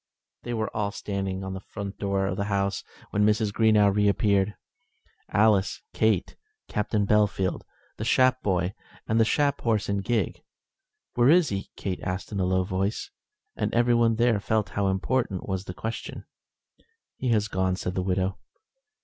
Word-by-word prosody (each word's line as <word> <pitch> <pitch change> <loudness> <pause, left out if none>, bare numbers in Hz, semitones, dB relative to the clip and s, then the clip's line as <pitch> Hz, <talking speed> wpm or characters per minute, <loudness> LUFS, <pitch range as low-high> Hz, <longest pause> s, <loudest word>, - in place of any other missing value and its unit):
They 120 0 -4
were 110 -1 -3
all 105 -2 0
standing 95 -2 -3
at 95 0 -4
the 95 - -5
front 100 0 -7
door 100 -1 0
of 95 -1 -2
the 100 - -1
house 100 -1 -1 0.3
when 105 - +2
Mrs. 105 0 +2
Greenow 105 -3 +4
re 105 0 +3
appeared, 100 0 +2 0.7
Alice, 100 -3 +2
Kate, 110 -5 +1 0.3
Captain 105 0 0
Bellfield, 100 -3 +1 0.4
the - - -4
Shap 130 +2 +3
boy, 90 -1 0 0.3
and 110 +1 +2
the 115 - +5
Shap 140 +3 +1
horse 110 -4 0
and 100 -1 0
gig. 110 -3 -1 0.7
"Where 120 +2 +4
is 170 0 +5
he?" 100 -1 -4
Kate 95 -2 -3
asked 90 +3 -4
in 100 - -3
a 95 - +2
low 95 0 +2
voice, 95 +2 -2 0.4
and - - -1
everyone 120 -1 +3
there 115 -2 +3
felt 110 +1 0
how 100 -1 0
important 95 +1 -1
was 95 -1 -2
the 90 - -6
question. 110 +4 -5 0.9
"He 130 - -2
has 110 -2 +2
gone," 95 -2 0
said 90 0 -4
the 95 - -1
widow. 95 +1 -1
100 Hz, 165 wpm, -26 LUFS, 95-110 Hz, 0.9 s, the